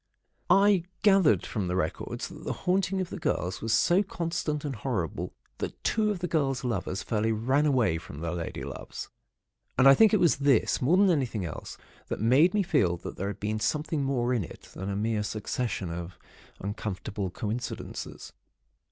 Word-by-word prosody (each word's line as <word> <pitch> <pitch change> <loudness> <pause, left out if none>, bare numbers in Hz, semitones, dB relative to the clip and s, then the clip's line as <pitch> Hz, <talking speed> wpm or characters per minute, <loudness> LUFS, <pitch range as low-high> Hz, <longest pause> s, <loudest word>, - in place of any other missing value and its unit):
"I 195 -1 +5 0.2
gathered 185 - +5
from 100 -4 -2
the 90 - -1
records 90 - -2
that - - -11
the - - -2
haunting 190 +1 +2
of 180 - -4
the - - -5
girls 95 - -1
was 115 - -2
so 175 - +4
constant 165 -5 -2
and 140 -3 -3
horrible 105 - -2 0.3
that - - -5
two 215 -1 +2
of 205 - 0
the 180 - 0
girls' 135 -6 0
lovers 100 -5 -2
fairly 110 0 0
ran 130 +7 +2
away 120 - +2
from 75 -3 -10
their 85 0 -3
lady 85 -1 -4
loves. - - -7 0.7
And 130 +1 +6
I 135 - +10
think 220 +9 +6
it 215 - +4
was 170 -2 +4
this, 140 -4 +3
more 155 +8 +4
than 195 -1 +5
anything 125 - 0
else, 80 - -7 0.3
that - - -3
made 135 - +4
me 205 - +3
feel 125 - +2
that - - -7
there 100 - -2
had 100 - -5
been 105 +1 -2
something 150 +5 0
more 125 -3 +1
in 115 -5 +1
it, - - -11
than 95 +2 -5
a 100 - -2
mere 110 +1 0
succession 105 -3 -3
of 85 +1 -6 0.4
uncomfortable 100 0 -4
coincidences. 115 +6 -5
125 Hz, 185 wpm, -28 LUFS, 100-165 Hz, 0.7 s, I